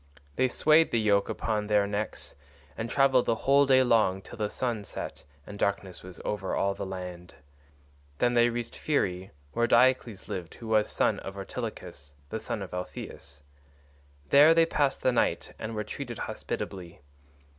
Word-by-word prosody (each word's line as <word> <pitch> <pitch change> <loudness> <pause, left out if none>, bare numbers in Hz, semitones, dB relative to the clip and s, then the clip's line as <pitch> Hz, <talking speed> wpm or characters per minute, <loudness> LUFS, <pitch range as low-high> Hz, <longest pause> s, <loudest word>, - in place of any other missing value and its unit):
They 130 - +3
swayed 155 +5 +4
the 115 - +1
yoke 100 -2 +2
upon 105 -2 -2
their 105 -1 +3
necks 105 +1 -3 0.4
and 115 +1 -4
travelled 135 -2 +3
the 115 - +3
whole 140 +1 +5
day 130 -1 +6
long 110 -6 +2
till - - -11
the 105 -1 0
sun 120 -4 -2
set - - -7 0.2
and 100 0 -9
darkness 100 -2 -1
was 90 -2 -11
over 95 -2 -2
all 100 0 +1
the 100 0 -5
land. 90 -2 -7 0.8
Then 120 0 +2
they 120 0 +5
reached 120 0 -4
Pherae, 95 -11 -1 0.2
where 120 +8 +1
Diocles 120 -4 +3
lived 90 -2 -6
who 115 - -10
was 110 -1 +3
son - - +1
of 95 0 -8
Ortilochus, 75 -6 -7 0.2
the 110 - -2
son 105 -1 -4
of 95 - -10
Alpheus. 70 -5 -7 0.9
There 150 +4 +8
they 165 0 +6
passed 145 -4 0
the 130 - +4
night 120 - 0
and 110 +1 -5
were 105 - -2
treated 120 +1 -6
hospitably. 90 -5 -5
110 Hz, 165 wpm, -28 LUFS, 95-125 Hz, 0.9 s, There